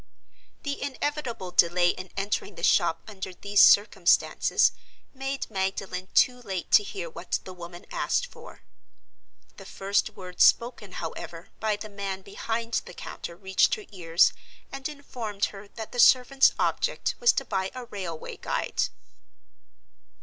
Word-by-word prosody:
The 285 -1 -3
inevitable 265 -8 -3
delay 175 0 +4
in 185 +1 -4
entering 200 0 -2
the 170 - -10
shop 170 -3 +3
under 190 -3 -7
these 200 +2 +3
circumstances 205 +2 +5 0.4
made 270 0 -4
Magdalen 190 -1 -3
too 250 0 +4
late 190 -6 -5
to - - +8
hear 195 -4 -6
what 170 +2 -3
the 185 - -9
woman 175 0 -10
asked - - 0
for. - - -14 0.9
The - - -11
first 200 +2 0
words 180 -2 0
spoken, 235 -5 +3
however, 165 0 -7
by 215 -1 +1
the 210 +1 -8
man 200 -2 -5
behind 230 +3 -2
the - - -10
counter 170 - -7
reached 190 - +2
her 425 -3 -10
ears, 170 -3 +3 0.4
and 275 +1 -4
informed 235 -8 -3
her 200 0 -10
that 220 +1 -8
the 245 - -5
servant's 265 +2 +6
object - - 0
was 480 - +6
to - - -2
buy 190 -2 -1
a 255 -1 -6
railway 185 -8 -6
guide. - - -1
200 Hz, 140 wpm, -27 LUFS, 185-240 Hz, 0.9 s, to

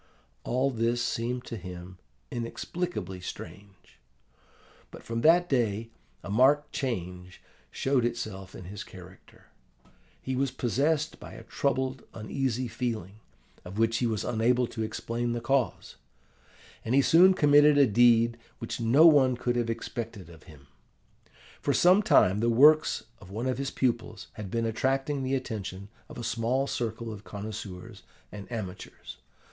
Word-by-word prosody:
All 130 +3 0
this 120 0 0
seemed 120 +1 -2
to 115 - -6
him 90 -1 -9 0.3
inexplicably 115 - -4
strange. 95 +2 -10 0.9
But - - -12
from 115 0 -3
that 175 +4 +5
day 115 - 0 0.3
a - - -8
marked 140 +7 +3
change 90 -8 -4 0.3
showed 135 -2 0
itself 105 -5 -4
in - - -9
his 100 +2 -7
character. 95 0 -15 0.7
He 130 - -4
was 135 +1 0
possessed 145 +5 -1
by - - -10
a - - -10
troubled, 130 -2 -2
uneasy 125 +2 -2
feeling, 110 -4 -4 0.4
of 95 +3 -9
which 115 0 +2
he 120 - +1
was 110 -2 -2
unable 120 +2 +2
to 115 -1 -6
explain 115 +2 -3
the 120 - -2
cause; 120 -4 -1 0.9
and 115 +3 0
he 140 - +5
soon 180 +7 +6
committed 145 -1 +5
a 140 - +7
deed 115 0 +4 0.2
which 115 - -5
no 120 +8 +5
one 135 -6 +6
could 120 0 -1
have 120 -1 0
expected 115 -5 -5
of 80 -1 -16
him. 70 -3 -15 1.0
For - - +1
some 185 +4 +5
time 100 - +4
the 115 +2 +1
works 150 +6 +5 0.2
of 95 - -14
one 110 +5 -4
of 130 0 -1
his 140 0 -2
pupils 120 -5 -2
had 105 -3 -7
been 115 +3 -1
attracting 135 +5 -1
the 130 +1 0
attention 100 -6 -5 0.2
of - - -10
a 120 - -6
small 115 +4 0
circle 115 -3 -4
of 105 -1 -10
connoisseurs 100 -3 -8 0.3
and 105 +2 -10
amateurs. 100 -5 -7
115 Hz, 150 wpm, -28 LUFS, 105-130 Hz, 1.0 s, a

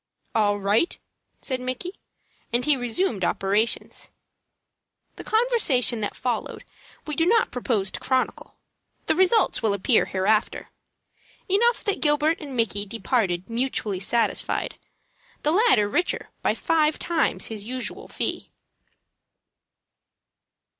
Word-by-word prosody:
"All 205 -2 +2
right!" 205 - +1 0.5
said 260 -2 -2
Micky, 255 +8 -4 0.6
and 240 +2 +1
he 300 - +4
resumed 245 - -1
operations. 200 +6 -1 1.1
The - - -9
conversation 435 - +2
that 205 - -3
followed 245 -3 -3 0.4
we 300 - -4
do 325 - +2
not 455 +3 +3
propose 220 -6 -1
to - - -6
chronicle. 260 -1 -2 0.5
The - - +3
results 375 +5 +3
will 215 -3 +1
appear 210 +5 +3
hereafter. 210 +3 0 0.8
Enough 460 +5 +2
that 405 - -1
Gilbert 300 +1 +2
and 280 -4 -7
Micky 205 -3 0
departed 205 -4 -1
mutually 230 -5 -2
satisfied, 225 +3 0 0.7
the 300 - +2
latter 395 - +4
the - - -4
richer 350 +11 -1
by - - +1
five 310 -2 +1
times 335 -2 -1
his 215 -2 -4
usual 255 +1 -5
fee. - - -3
250 Hz, 120 wpm, -24 LUFS, 210-320 Hz, 1.1 s, he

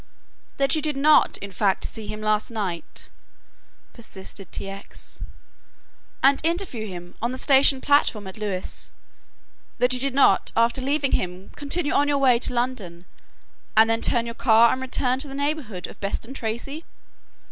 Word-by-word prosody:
"That 275 0 +2
you 310 - -1
did 300 -2 -2
not 300 +2 +4
in 200 - -6
fact 195 0 +1
see 220 -2 -6
him 215 - -6
last 215 0 0
night," 200 -7 -4 0.8
persisted 195 -4 -10
T. - - -5
X., 195 +1 -9 1.0
"and 275 +1 +5
interview 330 - -1
him 175 -2 -9
on 235 +2 -1
the 255 - -5
station 270 -1 +5
platform 270 -7 +2
at 190 - -8
Lewes, 200 -4 -4 0.9
that 250 +1 +2
you 250 - 0
did 270 0 -2
not 265 -8 +4
after 230 +3 +3
leaving 280 +1 0
him 180 +1 -2
continue 290 +2 -1
on 290 - +3
your 290 -1 +2
way 255 -4 +4
to - - 0
London 235 -9 -3 0.7
and 220 +1 +7
then 225 0 0
turn 235 -1 +1
your 230 - -5
car 230 -1 +5
and 260 - -4
return 255 0 0
to 290 - -1
the 270 - -8
neighbourhood 280 - -3
of - - -12
Beston 215 +5 -4
Tracey?" 270 +6 -4
240 Hz, 165 wpm, -24 LUFS, 210-275 Hz, 1.0 s, and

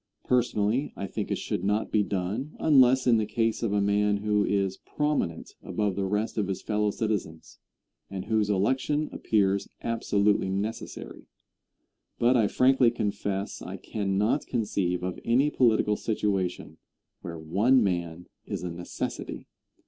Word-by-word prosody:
Personally, 120 +1 +1
I 100 - -3
think - - -4
it - - 0
should 90 - -3
not 105 +2 0
be 105 - +3
done 105 +9 -3
unless 130 -3 +5
in 120 -2 +5
the 110 -1 0
case 115 +1 0
of 115 -4 0
a 100 -1 +2
man 105 0 +2
who 105 0 +1
is 100 -2 0
prominent 150 - -2
above 105 -3 -1
the 95 0 -1
rest 105 +3 -1
of 100 - 0
his 95 -2 -4
fellow 105 -1 +1
citizens, 100 -7 -3 0.5
and 95 -1 -5
whose 110 -2 +1
election 130 +9 +1
appears 100 -2 +1
absolutely 105 -4 +1
necessary. 105 +4 -5 0.9
But 120 +2 +3
I 110 -4 +4
frankly 130 +2 +4
confess 100 -3 -3
I - - -6
cannot 105 +5 -1
conceive 95 -6 -1
of 90 0 -3
any 135 +6 +3
political 110 -4 +3
situation 100 -5 -2 0.4
where 85 -1 -6
one 105 +11 +3
man 85 -3 -2 0.2
is - - -4
a 90 - -3
necessity. 85 +1 -5
105 Hz, 145 wpm, -27 LUFS, 95-115 Hz, 0.9 s, unless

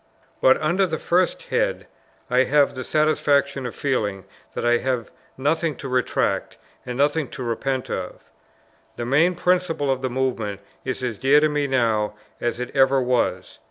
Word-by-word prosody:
But 130 - +5
under 175 +5 +2
this 160 -2 -4
first 180 +1 +1
head - - -1 0.4
I 125 +1 +3
have 145 +1 +3
the 130 - -5
satisfaction 140 -3 +1
of 120 - -8
feeling 105 -8 -1 0.3
that - - -2
I 120 0 +4
have 125 -3 -2 0.3
nothing 155 +3 0
to - - -7
retract, 125 -1 0 0.3
and 125 0 -4
nothing 145 +1 +1
to 130 - -7
repent 130 +3 -2
of. 90 -1 -6 0.6
The 120 - -4
main 160 +8 +3
principle 180 -6 +1
of 130 -1 -1
the 130 - -1
movement 120 -6 -2 0.2
is 130 0 -4
as 115 -5 -3
dear 135 +3 +5
to 155 0 +2
me 145 -1 0
now, 110 -5 +1 0.2
as 120 0 -2
it 125 +2 -5
ever 135 0 +4
was. 120 -8 -1
130 Hz, 165 wpm, -23 LUFS, 120-150 Hz, 0.6 s, But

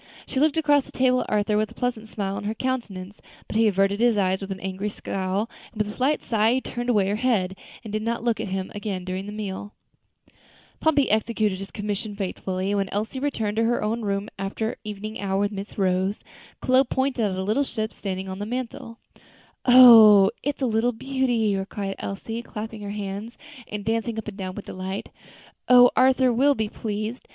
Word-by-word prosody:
She 265 - -2
looked 310 +2 +3
across 290 -3 +3
the - - -12
table 255 -1 +2
at - - -6
Arthur 210 0 +1
with 215 0 +1
a - - -15
pleasant 235 -3 -2
smile 200 -2 -3
on 205 - -5
her 215 +2 -2
countenance, 210 -7 -4 0.2
but - - -8
he 225 0 +4
averted 195 0 +2
his 235 -2 +3
eyes 190 -1 +1
with 195 - -6
an 190 - -4
angry 190 +2 -3
scowl; 195 +1 -2 0.2
and 230 - -16
with 210 0 -1
a - - -15
slight 275 +4 +1
sigh 225 +1 +2
she 260 - 0
turned 240 -1 -4
away 205 -5 +3
her 205 +2 0
head, 210 -7 +1 0.3
and 215 -2 -8
did 215 - -1
not 230 +1 -2
look 235 -2 +1
at - - -3
him 190 0 -3
again 200 -3 -4
during 185 +1 -4
the - - -5
meal. 205 -1 -6 1.0
Pompey 290 -6 +2
executed 215 -2 +1
his 195 0 -7
commission 205 0 -4
faithfully; 190 -1 -3
and 205 - +1
when 195 -1 -1
Elsie 215 +6 -3
returned 225 -7 -2
to 225 - +3
her 240 -1 +1
own 225 +2 -1
room 200 -1 -2
after 195 +3 -2
her - - -7
evening 215 +1 -6
hour 195 -1 0
with 205 0 0
Miss 200 0 -7
Rose, 190 +1 +1 0.4
Chloe 255 +1 +4
pointed 265 -1 -1
out 200 -3 0
the 190 - -2
little 215 +8 +1
ship 220 -4 -3
standing 190 -1 -4
on 190 0 -6
the 205 - -4
mantel. 235 -1 -5 0.7
"Oh! 225 -6 +9
it's 285 0 -2
a - - +4
little 235 +1 +1
beauty," 230 -5 0
cried 195 -2 -4
Elsie, 225 +4 -5
clapping 220 -1 -7
her 205 - -5
hands 205 +2 -5 0.3
and 205 -1 -6
dancing 225 +1 -1
up 220 - -5
and 210 - -6
down 190 -2 -5
with 210 - -7
delight; 190 +2 -5 0.6
"how 245 0 +8
Arthur 260 -1 +4
will 280 +4 +4
be 220 -3 -2
pleased! 215 +3 -5
215 Hz, 210 wpm, -24 LUFS, 195-235 Hz, 1.0 s, Oh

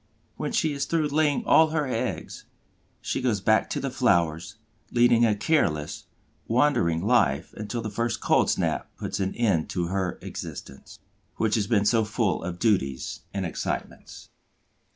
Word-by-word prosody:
When - - -3
she 155 -2 +1
is 140 - -2
through 160 -3 0
laying 150 -1 +1
all 160 - +6
her 155 -1 0
eggs, 125 -4 -4 0.6
she - - -2
goes 120 -5 +1
back 110 +2 +2
to - - -2
the 135 - -3
flowers, 85 - +1 0.3
leading 120 -1 +4
a 105 - +2
careless, 75 - 0 0.4
wandering 115 - +2
life 80 - +2
until 105 +3 -5
the 110 - -4
first 115 +3 -1
cold - - +2
snap - - -1
puts - - -4
an 95 0 -2
end 100 -10 +1
to 85 -2 -2
her 95 -2 -2
existence, 70 - -8 0.4
which 110 -1 0
has 105 -3 +1
been 105 -4 +2
so 115 +1 +3
full 105 -4 -1
of 90 0 -4
duties 70 - 0
and 95 -2 -3
excitements. 85 - -5
110 Hz, 155 wpm, -26 LUFS, 90-125 Hz, 0.6 s, all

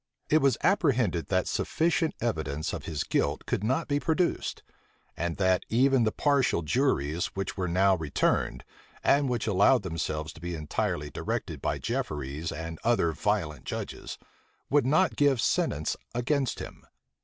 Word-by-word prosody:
It 155 - +6
was 135 -4 +3
apprehended 125 - +2
that 95 -1 +1
sufficient 165 0 0
evidence 80 -10 -2
of - - -5
his 75 -3 -2
guilt - - -1
could - - -1
not 130 +9 0
be 145 0 +1
produced; 170 +3 -1 0.5
and 85 -1 -2
that 95 -2 +2
even 130 +1 +4
the 110 - +2
partial 140 - +2
juries 85 - +1
which 95 -1 -3
were 95 -2 -2
now 95 +3 +4
returned, 80 -5 0 0.4
and 140 -1 +3
which 120 -3 -1
allowed 105 +3 +4
themselves 80 -3 -3
to 80 - -14
be 85 0 -4
entirely 75 -1 -2
directed - - -4
by - - -1
Jefferies 75 +2 -3
and 80 +1 -6
other 115 -8 +2
violent 80 -2 -1
judges, - - -5 0.5
would 140 -3 +4
not 160 +6 +3
give 140 -4 +3
sentence 75 -7 0 0.2
against 130 +2 0
him. - - -9
100 Hz, 150 wpm, -28 LUFS, 80-135 Hz, 0.5 s, It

